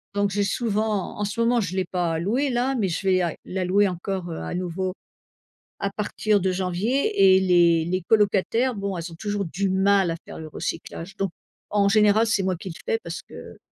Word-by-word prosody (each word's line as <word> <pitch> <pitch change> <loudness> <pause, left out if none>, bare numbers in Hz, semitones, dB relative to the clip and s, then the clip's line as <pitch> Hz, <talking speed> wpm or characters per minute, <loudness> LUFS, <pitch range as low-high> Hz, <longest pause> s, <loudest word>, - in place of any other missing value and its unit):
Donc 205 0 +2
j'ai 205 +1 +1
souvent, 215 -2 -1
en 210 - 0
ce 205 +3 -2
moment 240 +1 +3
je 185 -4 -2
l'ai 190 - +1
pas 175 -3 -1
loué 240 - 0
là, 250 +2 0
mais 215 -6 +1
je 180 +2 -3
vais 185 -1 +4
à 170 -3 -1
la 185 -1 -3
louer 200 +2 +3
encore, 180 0 -4
heu, 160 - -5
à - - -5
nouveau, 185 +1 -2 0.9
à 200 - -1
partir 210 +1 0
de 190 -1 0
janvier 195 - +2
et - - +4
les 170 -3 +4
les 185 +1 -1
colocataires, 220 +5 +2
bon 200 -1 -3
elles 170 +1 -5
ont - - -10
toujours 205 +2 -3
du 190 +4 -1
mal 190 -1 +3
à 165 - -2
faire - - -9
le 160 - -7
recyclage, 170 +4 -6
donc 195 -2 -1 0.4
en 200 -1 +3
général 210 +2 +4
c'est 215 -3 +1
moi 185 -1 0
qui 185 - -8
le 170 - -7
fais 460 -1 0
parce - - -6
que... - - -12
195 Hz, 215 wpm, -24 LUFS, 180-210 Hz, 0.9 s, vais